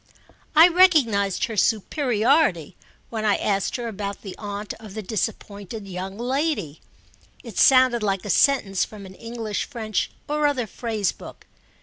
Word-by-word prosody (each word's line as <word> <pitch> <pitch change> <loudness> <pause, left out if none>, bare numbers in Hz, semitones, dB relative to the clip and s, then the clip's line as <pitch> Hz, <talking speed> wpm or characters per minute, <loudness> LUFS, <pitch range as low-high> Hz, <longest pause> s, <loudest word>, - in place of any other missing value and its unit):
I 320 +3 +9
recognised 290 - +3
her 225 - -6
superiority 220 - +1 0.4
when 220 -2 -3
I 210 -2 +3
asked 200 -2 -1
her 240 -2 -3
about 200 -2 -5
the 195 -3 -7
aunt 205 0 -5
of 215 -3 -11
the 215 - -5
disappointed 200 0 -4
young 190 +1 -6
lady: 250 - -2 0.6
it 230 -6 -6
sounded 255 -3 +5
like 195 -2 -1
a 205 - -1
sentence 205 -6 +3
from 205 -2 -9
an 190 - -11
English 230 0 -4
French 220 -6 -3 0.2
or 300 0 +1
other 265 -5 -1
phrase 220 -3 -2
book. - - -13
215 Hz, 145 wpm, -23 LUFS, 200-255 Hz, 0.6 s, I